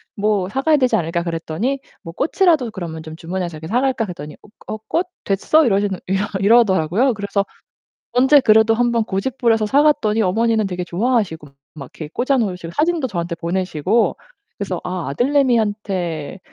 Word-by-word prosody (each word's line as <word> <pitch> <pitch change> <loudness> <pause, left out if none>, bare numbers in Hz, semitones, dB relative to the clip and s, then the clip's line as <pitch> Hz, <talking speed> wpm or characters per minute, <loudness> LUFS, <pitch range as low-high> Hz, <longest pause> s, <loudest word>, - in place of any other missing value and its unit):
뭐 205 -2 0
사가야 290 +6 +2
되지 255 -2 +2
않을까?" 170 +1 -1
그랬더니 170 +10 -2 0.2
뭐 165 - -8
"꽃이라도 315 - +2
그러면 170 -6 -6
좀 155 0 -9
주문해서 175 -1 -4
이렇게 160 - -8
사갈까?" 250 +2 +1
그랬더니 150 -6 -8 0.3
"어 215 - -4
꽃 345 +3 0 0.2
됐어?" 290 +11 +2
이러시는 200 -4 +1
이러 195 +2 0
이러더라고요. 205 - +3
그래서 200 -1 -2 0.7
언제 265 +4 +5
그래도 220 -2 +5
한번 235 -1 +1
고집부려서 225 +1 0
사갔더니 275 -5 +3
어머니는 220 +2 +1
되게 180 -1 -4
좋아하시고 180 - -1 0.3
막 140 -4 -9
이렇게 155 - -7
꽂아 260 - 0
놓으시고 180 -7 -3
사진도 315 -1 +1
저한테 170 -4 -3
보내시고 180 +4 0 0.4
그래서 190 -3 -3
'아 180 -2 -4
아들내미한테 205 - 0
205 Hz, 405 characters per minute, -19 LUFS, 175-245 Hz, 0.7 s, 언제